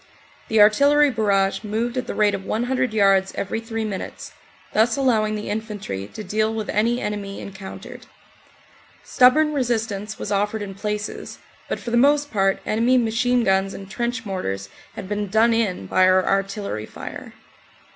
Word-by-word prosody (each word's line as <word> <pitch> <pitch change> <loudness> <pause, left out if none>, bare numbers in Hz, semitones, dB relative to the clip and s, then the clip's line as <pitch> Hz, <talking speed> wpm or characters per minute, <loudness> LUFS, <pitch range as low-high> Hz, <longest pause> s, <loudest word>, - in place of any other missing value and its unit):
The 220 - +2
artillery 280 +8 +5
barrage 200 -3 +1
moved 225 +3 -2
at 255 - -3
the - - -4
rate 210 -1 +3
of 195 -1 -4
100 250 +3 -1
yards 195 -2 +3
every 200 +3 -2
three 225 -1 -4
minutes, 200 -3 -6 0.4
thus 225 +3 +3
allowing 220 -6 +2
the 210 - -5
infantry 205 - -5
to 215 - -6
deal 215 +3 0
with 220 -1 -4
any 230 +3 +1
enemy 205 -3 -4
encountered. 190 -1 -9 1.0
Stubborn 300 +4 +4
resistance 220 -6 -2
was 205 - -5
offered 205 +1 0
in 195 -1 -7
places, 210 +1 -5 0.3
but - - -2
for 235 - -6
the 235 - +2
most 290 +3 +3
part 195 -2 +1
enemy 235 +4 +2
machine 245 +1 +1
guns 190 -1 +1
and 195 0 -10
trench 235 0 -3
mortars 100 - -4 0.3
had 190 - -7
been 205 +1 -2
done 220 +4 +3
in 205 - -1
by 185 - +3
our 185 0 +4
artillery 195 - -2
fire. - - -9
215 Hz, 160 wpm, -22 LUFS, 195-235 Hz, 1.0 s, artillery